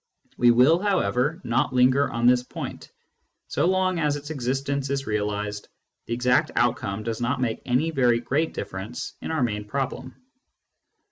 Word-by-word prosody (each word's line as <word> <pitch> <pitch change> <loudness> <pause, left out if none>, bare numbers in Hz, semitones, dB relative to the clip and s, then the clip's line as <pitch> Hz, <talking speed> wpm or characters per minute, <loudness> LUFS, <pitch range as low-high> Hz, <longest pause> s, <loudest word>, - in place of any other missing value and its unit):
We 120 - +4
will, 130 +8 +5
however, 160 - 0
not 120 +2 0
linger 130 +3 +4
on 115 0 -2
this 125 0 +5
point; 125 - -8 0.6
so - - +1
long 185 -1 +1
as 150 -2 +1
its 145 +1 -7
existence 135 0 -2
is 140 0 -2
realised, 105 -1 -2 0.4
the 115 - -2
exact 125 +1 +2
outcome 100 +2 0
does 115 0 -3
not 125 +3 0
make 120 -3 -1
any 130 +6 +1
very 125 -5 +3
great 140 +7 -1
difference 95 +6 -6
in - - -5
our 160 -5 0
main 105 -3 -1
problem. 130 +2 -4
125 Hz, 155 wpm, -25 LUFS, 115-145 Hz, 0.6 s, will